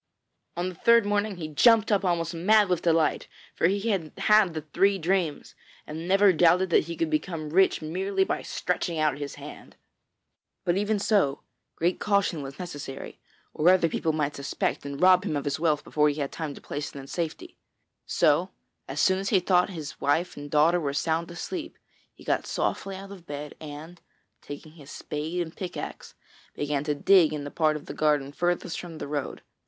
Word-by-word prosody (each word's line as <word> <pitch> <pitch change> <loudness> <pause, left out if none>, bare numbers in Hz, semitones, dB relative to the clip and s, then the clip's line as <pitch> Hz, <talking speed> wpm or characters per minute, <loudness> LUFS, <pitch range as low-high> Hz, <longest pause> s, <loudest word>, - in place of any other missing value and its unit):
On 175 +1 -1
the - - -8
third 235 +5 +4
morning 205 0 0
he 160 -3 -5
jumped 225 - +4
up 205 -1 +2
almost 170 -2 0
mad 200 +4 +4
with 180 -2 +1
delight, 165 -2 +1 0.3
for - - +2
he 200 +4 -1
had 165 -6 -2
had 210 -5 +4
the 155 - -4
three 195 +6 +2
dreams, 175 -3 -1 0.3
and 160 +3 -6
never 195 +1 +5
doubted 175 +2 +4
that - - +4
he 170 +1 -5
could 160 -1 -1
become 155 -1 -2
rich 190 -1 +3
merely 190 +5 0
by - - -2
stretching 175 -2 -2
out 150 -3 +1
his 145 -1 -5
hand. - - -11 0.9
But 175 - +2
even 205 +2 +1
so, 200 -9 +1 0.3
great 175 +2 0
caution 200 -6 +1
was 135 +1 -8
necessary, 145 -6 -7 0.3
or 160 +4 +3
other 185 -2 +5
people 160 0 -1
might 150 -2 -1
suspect 140 0 -2
and 140 0 -6
rob 185 0 +6
him 155 - -2
of 145 - -3
his 145 +1 -1
wealth 155 -3 +1
before 150 0 +2
he 145 +1 -3
had 140 -1 -2
time 155 -4 -5
to - - -12
place 145 +1 -5
it - - -12
in 135 - -8
safety. 175 - -5 0.5
So - - +2 0.4
as - - -5
soon 190 0 +3
as 195 - -2
he 195 - +4
thought 180 +1 +2
his 155 -6 -8
wife 160 +6 +1
and 145 0 -8
daughter 155 +4 +4
were 140 -4 -2
sound 165 +3 -1
asleep, 305 - -6 0.3
he - - -18
got - - -1
softly 195 -1 -2
out 195 +1 -9
of 185 -4 -12
bed 145 0 -6
and, 155 +3 -9 0.4
taking 145 +2 -9
his 150 -4 -15
spade 160 +4 -4
and 160 - -9
a - - -28
pickaxe, 180 -2 -7 0.4
began 145 -1 -1
to 150 -1 0
dig 170 +1 +5
in 150 -1 -4
the 145 - -7
part 155 -2 +2
of 150 - -7
the - - -7
garden 150 -3 +1
furthest 175 +2 -1
from 170 -3 -8
the - - -6
road. 145 -1 -4
165 Hz, 200 wpm, -26 LUFS, 150-190 Hz, 0.9 s, rob